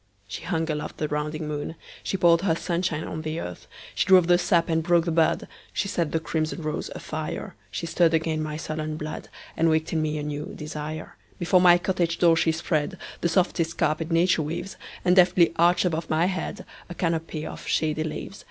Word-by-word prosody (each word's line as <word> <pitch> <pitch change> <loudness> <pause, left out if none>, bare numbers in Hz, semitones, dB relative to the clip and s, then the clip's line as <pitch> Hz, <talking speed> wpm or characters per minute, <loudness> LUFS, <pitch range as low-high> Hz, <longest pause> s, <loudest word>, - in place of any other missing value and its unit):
She 110 - -6
hung 165 -2 -1
aloft 150 0 -4
the 150 - -1
rounding 150 +1 -3
moon, 150 +2 -4 0.3
She 190 - -2
poured 170 -1 +5
her 180 -4 +2
sunshine 170 -2 -1
on 160 - -5
the 155 +1 -3
earth, 90 - -7 0.3
She - - 0
drove 185 -2 +7
the 175 0 +4
sap 170 -2 +2
and 160 -1 +1
broke 170 0 +3
the 170 - 0
bud, 160 0 +2 0.3
She 200 - -1
set 170 -5 -1
the 160 - +1
crimson 160 0 -2
rose 155 0 -3
afire. - - -5 0.2
She - - -4
stirred 165 0 +3
again 160 -1 0
my 155 0 -3
sullen 155 0 -4
blood, 155 0 -6 0.3
And 165 0 +3
waked 160 +1 +1
in 160 - +1
me 155 0 -1
a 150 - -3
new 150 0 -4
desire. 150 +1 -6 0.2
Before 180 +1 +3
my 175 -1 +7
cottage 175 -2 0
door 170 -2 +5
she 165 0 +3
spreadThe 160 +2 -1 0.3
softest 165 -1 +1
carpet 160 0 0
nature 170 0 +3
weaves, 165 +5 -4 0.3
And 180 0 +5
deftly 180 -2 +5
arched 175 +1 +4
above 165 -2 -1
my 160 +2 +3
headA 185 -3 -3 0.3
canopy 165 -2 -2
of - - -8
shady 155 0 +1
leaves. 160 +5 -6
165 Hz, 195 wpm, -25 LUFS, 155-175 Hz, 0.3 s, drove